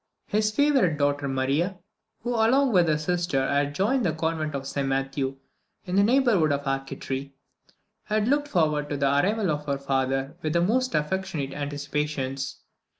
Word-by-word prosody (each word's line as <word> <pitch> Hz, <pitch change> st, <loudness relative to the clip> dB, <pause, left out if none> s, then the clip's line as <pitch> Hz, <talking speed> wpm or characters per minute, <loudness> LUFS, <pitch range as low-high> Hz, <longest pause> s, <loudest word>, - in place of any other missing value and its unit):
His 215 Hz, +1 st, +1 dB
favourite 245 Hz, -, +2 dB
daughter 145 Hz, 0 st, +1 dB
Maria, 140 Hz, +8 st, 0 dB, 0.5 s
who 245 Hz, -, -2 dB
along 240 Hz, +3 st, +3 dB
with 175 Hz, -3 st, +5 dB
her 155 Hz, -1 st, +2 dB
sister 155 Hz, -4 st, 0 dB
had 145 Hz, 0 st, 0 dB
joined 235 Hz, -, +1 dB
the 170 Hz, -, +1 dB
convent 160 Hz, -1 st, -2 dB
of 135 Hz, -1 st, -4 dB
St 140 Hz, 0 st, -2 dB
Matthew 135 Hz, 0 st, -1 dB, 0.5 s
in 180 Hz, -, -3 dB
the 200 Hz, -, +5 dB
neighbourhood 220 Hz, -, +3 dB
of 140 Hz, 0 st, -1 dB
Arcetri, 135 Hz, 0 st, -3 dB, 0.7 s
had 215 Hz, 0 st, 0 dB
looked 290 Hz, +2 st, +2 dB
forward 155 Hz, -, +1 dB
to 145 Hz, -, -2 dB
the 140 Hz, -, +1 dB
arrival 185 Hz, +7 st, +2 dB
of 150 Hz, 0 st, -4 dB
her 140 Hz, -1 st, 0 dB
father 135 Hz, +2 st, -1 dB
with 155 Hz, -1 st, -1 dB
the 170 Hz, -, +3 dB
most 250 Hz, +7 st, +1 dB
affectionate 150 Hz, -3 st, -2 dB
anticipations. 145 Hz, -1 st, -3 dB
150 Hz, 160 wpm, -26 LUFS, 140-195 Hz, 0.7 s, with